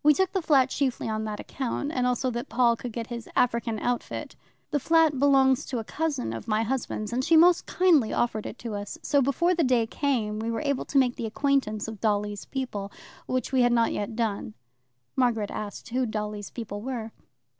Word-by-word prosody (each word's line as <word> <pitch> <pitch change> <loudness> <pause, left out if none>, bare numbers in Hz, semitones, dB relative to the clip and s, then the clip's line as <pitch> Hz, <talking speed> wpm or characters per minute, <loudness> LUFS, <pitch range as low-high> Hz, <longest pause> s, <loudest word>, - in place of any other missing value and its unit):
"We 300 0 +6
took 380 -1 +1
the 380 - 0
flat 270 -5 +3
chiefly 265 -5 -1
on 220 0 -2
that 210 -1 -4
account, 275 +2 -3
and 250 -4 0
also 250 +1 0
that 240 0 -4
Paul 240 -1 +3
could 240 +1 -6
get 230 +1 -4
his 235 -1 -7
African 235 -2 +1
outfit. 245 +3 -3 0.4
The 295 - +1
flat 320 -1 +3
belongs 270 -1 +4
to 255 - -3
a 225 - -2
cousin 285 - -2
of 115 - -7
my 215 0 +1
husband's, 230 -2 -3
and 255 +2 0
she 320 +3 +5
most 345 +2 +5
kindly 330 -11 +3
offered 220 -3 -1
it - - -8
to 225 - -3
us. 205 0 -5
So 285 -2 +3
before 310 +7 +2
the 340 -2 +1
day 250 -4 +3
came 225 -4 -1
we 225 +1 -2
were 230 - -2
able 280 -2 0
to 280 - -1
make 250 -2 +3
the 230 - -3
acquaintance 225 -4 0
of 220 -3 -8
Dolly's 205 -1 0
people, 210 -7 -4 0.4
which 255 0 -1
we 260 -1 +3
had 245 0 +4
not 230 -1 +3
yet 205 +2 -3
done." 215 -2 -2 0.6
Margaret 230 -5 +1
asked 210 +2 -6
who 250 +1 0
Dolly's 210 -1 -4
people 205 -3 -6
were. 230 -2 -4
245 Hz, 210 wpm, -27 LUFS, 215-275 Hz, 0.6 s, We